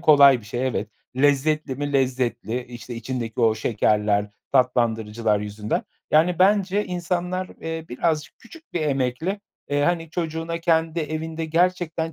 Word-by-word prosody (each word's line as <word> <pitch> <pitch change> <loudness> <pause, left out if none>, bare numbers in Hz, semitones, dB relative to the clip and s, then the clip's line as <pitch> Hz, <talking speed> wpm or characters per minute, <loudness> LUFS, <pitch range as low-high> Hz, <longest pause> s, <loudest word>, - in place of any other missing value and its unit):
kolay 140 -4 +7
bir - - -16
şey, 120 +5 -2
evet. 115 -4 -2 0.3
Lezzetli 145 +1 +2
mi, 145 +1 -3
lezzetli, 125 -2 0
işte, 120 0 -9
içindeki 115 0 -4
o 115 -1 +4
şekerler, 105 -2 +1 0.2
tatlandırıcılar 115 -4 +2
yüzünden. 105 +1 -2 0.3
Yani, 165 +3 +4
bence 200 +1 +3
insanlar, 180 +1 -2
eee, 165 0 -4
birazcık 155 +4 -1
küçük 320 +7 -16
bir 175 - -1
emekle, 145 +6 -1 0.3
eee, 145 0 +1
hani, 165 0 0
çocuğuna 165 0 -3
kendi 165 -1 +1
evinde 160 +1 -3
gerçekten 165 0 0
145 Hz, 135 wpm, -24 LUFS, 120-165 Hz, 0.3 s, kolay